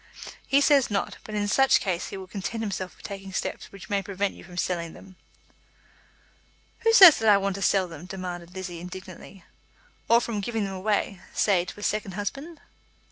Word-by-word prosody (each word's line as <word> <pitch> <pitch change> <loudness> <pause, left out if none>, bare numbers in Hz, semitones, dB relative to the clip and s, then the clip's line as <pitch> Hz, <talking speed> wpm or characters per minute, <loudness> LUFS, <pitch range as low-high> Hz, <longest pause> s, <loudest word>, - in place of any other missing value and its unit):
"He 280 +1 +4
says 280 -3 +4
not; 200 -2 -2
but 215 - -7
in 205 0 0
such 270 +5 +4
case 180 -4 -2
he - - -7
will 190 - -8
content 210 +4 -5
himself 190 -3 -4
with - - -19
taking 195 -1 -7
steps - - -4
which 195 -1 -11
may 200 0 0
prevent 200 +1 -2
you - - -13
from 175 0 -13
selling 170 -2 -2
them." 190 -1 -14 1.6
"Who 455 - +3
says 375 -8 +10
that 220 -1 +3
I 205 - +7
want 195 0 -1
to 195 - -6
sell 190 -1 +2
them?" 170 0 -10
demanded 180 -2 -7
Lizzie 180 -2 -6
indignantly. 185 +1 -10 0.7
"Or 230 - +7
from 230 -3 -3
giving 225 +1 -2
them 195 -1 -4
away, 195 -1 -1
say 185 -4 +2
to 205 - -9
a - - -8
second 210 -2 -1
husband." 275 - -5
195 Hz, 190 wpm, -26 LUFS, 185-215 Hz, 1.6 s, says